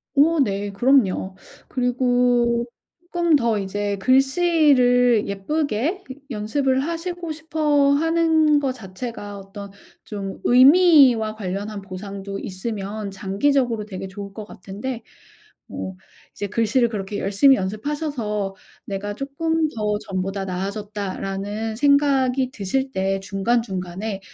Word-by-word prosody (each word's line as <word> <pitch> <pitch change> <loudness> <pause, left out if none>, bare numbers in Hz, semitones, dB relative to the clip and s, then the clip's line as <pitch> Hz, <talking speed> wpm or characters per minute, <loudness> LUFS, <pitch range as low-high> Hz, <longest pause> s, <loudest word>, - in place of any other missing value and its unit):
어 315 +3 +4
네. 200 -5 0
그럼요. 200 -4 +2 0.3
그리고 245 -1 +1 0.5
쪼끔 340 -3 +3
더 235 -5 +2
이제 200 +1 -2
글씨를 260 - +3
예쁘게 285 - -2 0.3
연습을 260 +4 0
하시고 335 +1 -4
싶어 305 -3 +1
하는 320 -1 +3
거 270 -2 -1
자체가 205 -2 -7
어떤 195 +1 -10 0.3
좀 195 -2 -6
의미와 260 -5 +6
관련한 200 +1 -4
보상도 195 +1 -7
있으면 200 +1 -5
장기적으로 220 +4 0
되게 190 -2 -7
좋을 200 +1 -8
것 215 -1 -7
같은데 215 +6 -7 0.7
뭐 190 0 -6 0.4
이제 205 - -4
글씨를 230 +3 +2
그렇게 205 -1 -4
열심히 260 +8 +4
연습하셔서 215 -1 -3 0.3
'내가 205 +1 -4
쪼끔 315 +5 -1
더 210 -1 -1
전보다 195 +1 -3
나아졌다.'라는 200 +2 -4
생각이 270 -2 +3
드실 265 +5 -2
때 195 0 -1
중간중간에 195 -1 -2
220 Hz, 255 characters per minute, -22 LUFS, 200-275 Hz, 0.7 s, 의미와